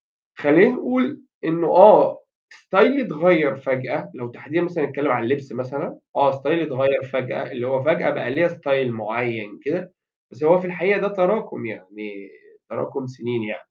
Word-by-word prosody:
فخلّينا -, -, +3 dB
نقول 260 Hz, +3 st, -2 dB, 0.2 s
إنه 165 Hz, 0 st, -1 dB
آه 190 Hz, +4 st, +7 dB, 0.3 s
ستايلي 275 Hz, 0 st, +2 dB
اتغيّر 165 Hz, -, +2 dB
فجأة، 135 Hz, +2 st, -4 dB
لو 120 Hz, -1 st, -9 dB
تحديدًا 150 Hz, +7 st, -4 dB
مثلًا 175 Hz, -3 st, -3 dB
هنتكلم 140 Hz, +1 st, -2 dB
عن 125 Hz, -1 st, -1 dB
اللبس 135 Hz, 0 st, -3 dB
مثلًا، 130 Hz, +3 st, -7 dB, 0.2 s
آه 140 Hz, -1 st, +3 dB
ستايلي 140 Hz, +5 st, -1 dB
اتغيّر 135 Hz, -2 st, 0 dB
فجأة، 130 Hz, 0 st, -5 dB
اللي 125 Hz, -1 st, -5 dB
هو 130 Hz, 0 st, -1 dB
فجأة 160 Hz, +4 st, +1 dB
بقى -, -, -4 dB
ليّا 165 Hz, +6 st, +2 dB
style 140 Hz, -6 st, -1 dB
معيّن 110 Hz, 0 st, -5 dB
كده 180 Hz, +4 st, -4 dB, 0.4 s
بس 155 Hz, -, -8 dB
هو 175 Hz, +4 st, +6 dB
في 185 Hz, -, -6 dB
الحقيقة 180 Hz, +3 st, 0 dB
ده 200 Hz, -, 0 dB
تراكم 200 Hz, -, -2 dB
يعني 105 Hz, -1 st, -12 dB, 0.4 s
تراكم 130 Hz, -, -6 dB
سنين 120 Hz, -2 st, -6 dB
يعني. 105 Hz, 0 st, -7 dB
140 Hz, 160 wpm, -21 LUFS, 125-175 Hz, 0.4 s, آه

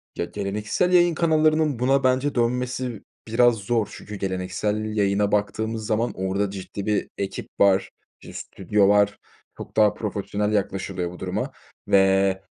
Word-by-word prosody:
Ya, -, -, -2 dB
geleneksel 105 Hz, -, -1 dB
yayın 175 Hz, -2 st, +5 dB
kanallarının 155 Hz, -4 st, +2 dB
buna 135 Hz, +2 st, +2 dB
bence 130 Hz, +2 st, +1 dB
dönmesi 125 Hz, -1 st, -1 dB, 0.2 s
biraz 120 Hz, +1 st, +4 dB
zor 110 Hz, 0 st, -1 dB
çünkü 105 Hz, -, -9 dB
geleneksel 95 Hz, +2 st, -2 dB
yayına 100 Hz, 0 st, +1 dB
baktığımız 110 Hz, +2 st, -1 dB
zaman 115 Hz, +2 st, 0 dB
orada 95 Hz, +2 st, -1 dB
ciddi 100 Hz, 0 st, -7 dB
bir 105 Hz, -1 st, 0 dB
ekip 100 Hz, -1 st, -4 dB
var, 95 Hz, -1 st, +4 dB, 0.3 s
bir -, -, -11 dB
stüdyo 100 Hz, +1 st, 0 dB
var. 105 Hz, 0 st, +3 dB, 0.4 s
Çok -, -, -10 dB
daha 105 Hz, -1 st, +5 dB
profesyonel 105 Hz, 0 st, -2 dB
yaklaşılıyor 95 Hz, -3 st, -2 dB
bu 90 Hz, -, -11 dB
duruma -, -, -3 dB, 0.4 s
ve 95 Hz, 0 st, +3 dB
105 Hz, 140 wpm, -24 LUFS, 100-120 Hz, 0.4 s, yayın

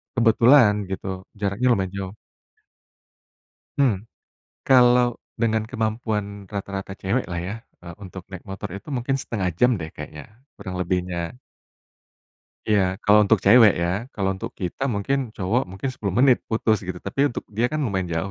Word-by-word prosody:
Kebetulan, 115 Hz, 0 st, +6 dB, 0.2 s
gitu, 95 Hz, 0 st, -5 dB, 0.3 s
jaraknya 100 Hz, +5 st, 0 dB
lumayan 95 Hz, -2 st, -2 dB
jauh. 95 Hz, +1 st, -5 dB, 1.6 s
Hmm, 115 Hz, -7 st, +1 dB, 0.6 s
kalau 125 Hz, -2 st, +5 dB, 0.2 s
dengan 110 Hz, -1 st, +1 dB
kemampuan 110 Hz, -3 st, -3 dB
rata-rata 100 Hz, -1 st, -5 dB
cewek 115 Hz, +7 st, 0 dB
lah 85 Hz, -, -2 dB
ya, 95 Hz, +4 st, -4 dB, 0.3 s
eee, 85 Hz, -1 st, -9 dB
untuk 95 Hz, -1 st, -9 dB
naik 95 Hz, -3 st, -9 dB
motor 95 Hz, 0 st, -6 dB
itu 100 Hz, -, -10 dB
mungkin 130 Hz, +1 st, -1 dB
1/2 100 Hz, -8 st, -2 dB
jam 125 Hz, +1 st, +5 dB
deh 80 Hz, -1 st, -5 dB
kayaknya, -, -, -8 dB, 0.3 s
kurang 95 Hz, -1 st, -7 dB
lebihnya. 90 Hz, +3 st, -2 dB, 1.3 s
Iya, 95 Hz, -3 st, +2 dB
kalau 105 Hz, +1 st, +6 dB
untuk 100 Hz, -, +4 dB
cewek, 110 Hz, 0 st, +8 dB
ya. 85 Hz, 0 st, 0 dB, 0.3 s
Kalau 95 Hz, -2 st, 0 dB
untuk 95 Hz, -, -6 dB
kita 90 Hz, +7 st, -4 dB
mungkin, 120 Hz, +4 st, -1 dB
cowok, 105 Hz, +7 st, +1 dB
mungkin 95 Hz, +8 st, -4 dB
10 100 Hz, -6 st, -3 dB
menit 130 Hz, -1 st, +5 dB
putus, 110 Hz, -1 st, +1 dB
gitu, 90 Hz, -1 st, -5 dB
tapi 135 Hz, +11 st, 0 dB
untuk -, -, -6 dB
dia 115 Hz, +4 st, +1 dB
kan 155 Hz, -, -2 dB
lumayan 95 Hz, -5 st, -1 dB
jauh, 85 Hz, +4 st, -2 dB
100 Hz, 150 wpm, -23 LUFS, 95-120 Hz, 1.6 s, cewek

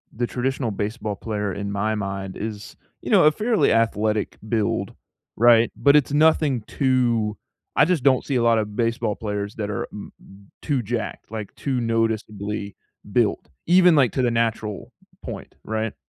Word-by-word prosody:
the 120 Hz, +1 st, -1 dB
traditional 125 Hz, -1 st, -2 dB
baseball 105 Hz, +1 st, -3 dB
player 105 Hz, -2 st, -3 dB
in 100 Hz, +1 st, -4 dB
my 105 Hz, +2 st, -1 dB
mind 100 Hz, -2 st, -4 dB
is, 105 Hz, -1 st, -6 dB, 0.3 s
you -, -, -5 dB
know, -, -, +6 dB
a 155 Hz, -, +7 dB
fairly 220 Hz, +6 st, +1 dB
athletic 110 Hz, -2 st, +1 dB
build, 110 Hz, -2 st, -1 dB, 0.4 s
right? 115 Hz, 0 st, +5 dB
But 140 Hz, 0 st, +4 dB
it's 145 Hz, -1 st, +3 dB
nothing 150 Hz, -4 st, +3 dB
too 120 Hz, -5 st, 0 dB, 0.4 s
I -, -, +5 dB
just 170 Hz, -5 st, 0 dB
don't 130 Hz, -2 st, +3 dB
see 140 Hz, -, -2 dB
a 120 Hz, -, +2 dB
lotta 115 Hz, -2 st, +3 dB
baseball 115 Hz, +1 st, -1 dB
players 105 Hz, -2 st, -4 dB
that 105 Hz, -2 st, -3 dB
are 105 Hz, -, -3 dB
m 105 Hz, -, -9 dB
m 100 Hz, 0 st, -18 dB
too 140 Hz, -5 st, 0 dB
jacked, 115 Hz, +1 st, -4 dB
like, 110 Hz, -3 st, -6 dB
too 135 Hz, -3 st, -2 dB
noticeably 110 Hz, -3 st, -2 dB, 0.4 s
built, -, -, +1 dB, 0.2 s
even, 180 Hz, 0 st, +6 dB
like, 130 Hz, -7 st, +3 dB
to 130 Hz, -, 0 dB
the 120 Hz, -1 st, +2 dB
natural 115 Hz, -3 st, -2 dB, 0.3 s
point, -, -, -8 dB
right? 110 Hz, 0 st, -2 dB
115 Hz, 165 wpm, -23 LUFS, 105-125 Hz, 0.4 s, a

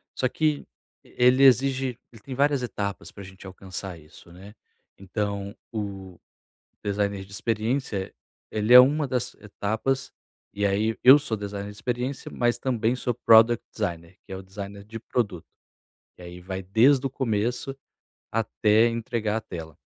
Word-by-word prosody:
Só 130 Hz, -, +1 dB
que 155 Hz, -1 st, 0 dB, 0.4 s
ele 125 Hz, +2 st, +3 dB
exige 130 Hz, -1 st, +3 dB
ele 115 Hz, -3 st, -16 dB
tem 130 Hz, +3 st, -7 dB
várias 140 Hz, -1 st, +2 dB
etapas 100 Hz, -3 st, -4 dB
para 100 Hz, -, -11 dB
a -, -, -10 dB
gente 95 Hz, +1 st, -12 dB
alcançar 95 Hz, -1 st, -8 dB
isso, 75 Hz, +2 st, -17 dB
né. 95 Hz, +4 st, -13 dB, 0.5 s
Então, 100 Hz, +1 st, -4 dB, 0.2 s
o 95 Hz, -4 st, -6 dB, 0.6 s
designer 100 Hz, -1 st, -2 dB
de 95 Hz, -, -19 dB
experiência, 110 Hz, -1 st, -2 dB, 0.4 s
ele 110 Hz, +3 st, +2 dB
é 125 Hz, -, +13 dB
uma 145 Hz, +3 st, +3 dB
das 125 Hz, -1 st, -3 dB
etapas, 110 Hz, +6 st, -3 dB, 0.4 s
e 100 Hz, 0 st, 0 dB
aí 105 Hz, +3 st, 0 dB
eu 130 Hz, +3 st, +10 dB
sou 135 Hz, -7 st, -3 dB
designer 100 Hz, 0 st, -6 dB
de 105 Hz, -, -13 dB
experiência, 125 Hz, +3 st, -3 dB
mas 120 Hz, 0 st, +1 dB
também 120 Hz, -1 st, 0 dB
sou 125 Hz, -1 st, -2 dB
product 115 Hz, 0 st, +5 dB
designer, 85 Hz, +2 st, -5 dB
que -, -, -12 dB
é -, -, -4 dB
o 95 Hz, -, -8 dB
designer 100 Hz, +1 st, -8 dB
de 115 Hz, +2 st, -8 dB
produto. 105 Hz, -7 st, -3 dB, 0.7 s
E -, -, -15 dB
aí 90 Hz, 0 st, -10 dB
vai 95 Hz, +1 st, -5 dB
desde 125 Hz, +8 st, +4 dB
o -, -, 0 dB
começo 125 Hz, +1 st, -2 dB, 0.6 s
até 110 Hz, 0 st, +3 dB
entregar 115 Hz, -2 st, -2 dB
a -, -, -1 dB
tela. 80 Hz, -6 st, -9 dB
110 Hz, 155 wpm, -25 LUFS, 100-125 Hz, 0.7 s, é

